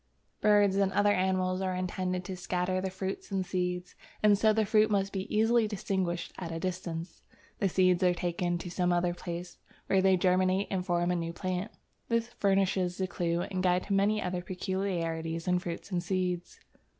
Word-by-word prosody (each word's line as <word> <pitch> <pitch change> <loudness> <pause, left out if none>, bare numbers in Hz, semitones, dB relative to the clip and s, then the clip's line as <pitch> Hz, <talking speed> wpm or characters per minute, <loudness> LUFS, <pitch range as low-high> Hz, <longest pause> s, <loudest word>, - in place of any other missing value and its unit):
Birds 205 -2 +4
and 195 -1 +2
other 205 +1 +4
animals 185 -1 +1
are 185 -1 -1
intended 185 0 -2
to 190 - -4
scatter 180 +1 -1
the 190 - -2
fruits 190 +1 -5
and 190 -2 -1
seeds, 180 -1 -2 0.3
and 210 -1 +6
so 215 +2 +4
the 215 0 +2
fruits 215 +1 +4
must 195 -1 +1
be 190 -1 -4
easily 225 +1 +3
distinguished 190 -4 -2
at 170 -3 -5
a 165 - -3
distance. 175 -2 -4 0.4
The 195 - +2
seeds 185 0 +3
are 180 -1 +3
taken 175 0 -1
to 175 0 -7
some 180 0 +1
other 175 0 +1
place, 175 0 -7 0.3
where 190 - +3
they 190 -1 +4
germinate 185 +2 +2
and 190 -2 0
form 175 -1 +1
a - - +1
new 170 -1 -3
plant. 185 +3 -3 0.4
This 230 0 +1
furnishes 195 -2 +2
the 190 - 0
clue 170 -2 -1
and 185 0 -3
guide 180 0 +2
to 200 - -2
many 205 +2 +3
other 180 0 -2
peculiarities 175 -3 -3
in 180 0 +3
fruits 175 +2 -6
and 175 -2 0
seeds. 180 -1 -2
185 Hz, 185 wpm, -30 LUFS, 175-195 Hz, 0.4 s, and